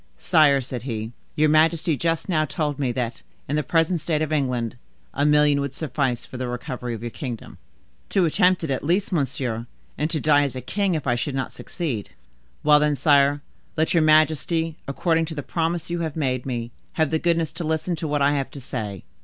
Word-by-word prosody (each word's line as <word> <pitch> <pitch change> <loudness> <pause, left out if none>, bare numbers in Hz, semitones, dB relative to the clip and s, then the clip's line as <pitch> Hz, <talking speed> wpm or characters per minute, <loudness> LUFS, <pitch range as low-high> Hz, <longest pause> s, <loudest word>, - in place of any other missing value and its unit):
"Sire," 150 -5 +4
said 125 -1 -5
he, 115 -3 -4 0.2
"your 155 +1 +4
majesty 160 +1 +3
just 165 +2 -1
now 160 -5 +2
told 150 -1 -2
me 130 -3 +1
that, 120 -1 -3 0.3
in 145 - -1
the 150 - +2
present 165 +2 +1
state 155 0 0
of 155 0 -2
England, 125 -6 0 0.4
a 145 +2 +1
million 150 -1 +4
would 140 -1 -4
suffice 135 -6 -1
for 130 - -9
the 125 0 -3
recovery 125 -1 -4
of 110 - -8
your 120 - -4
kingdom." 120 -4 -7 0.5
"To 190 -3 +3
attempt 180 +3 +3
it 155 - -2
at 130 - -1
least, 180 +7 +1
monsieur; 130 -7 -1 0.3
and 150 - +1
to 160 -2 -1
die 145 -1 +4
as 140 -2 -1
a - - -3
king 195 - 0
if 155 - -3
I 125 - +2
should 130 +3 -2
not 130 -1 -3
succeed." 135 - -4 0.5
"Well, 150 0 +6
then, 150 0 +2
sire, 145 -1 +3 0.3
let 160 +3 +2
your 170 - +4
majesty, 155 +1 +3
according 165 +3 +1
to 160 0 -6
the 145 - -4
promise 170 +2 -2
you 175 - -1
have 160 -3 -3
made 130 -5 -1
me, 120 -2 -3 0.2
have 160 -2 +1
the 160 - +2
goodness 165 -1 +1
to 170 +2 -5
listen 160 +2 -1
to 160 - -3
what 145 -1 +1
I 140 - +4
have 140 -2 -1
to 140 - -9
say." 110 -7 -5
150 Hz, 210 wpm, -24 LUFS, 130-160 Hz, 0.5 s, Well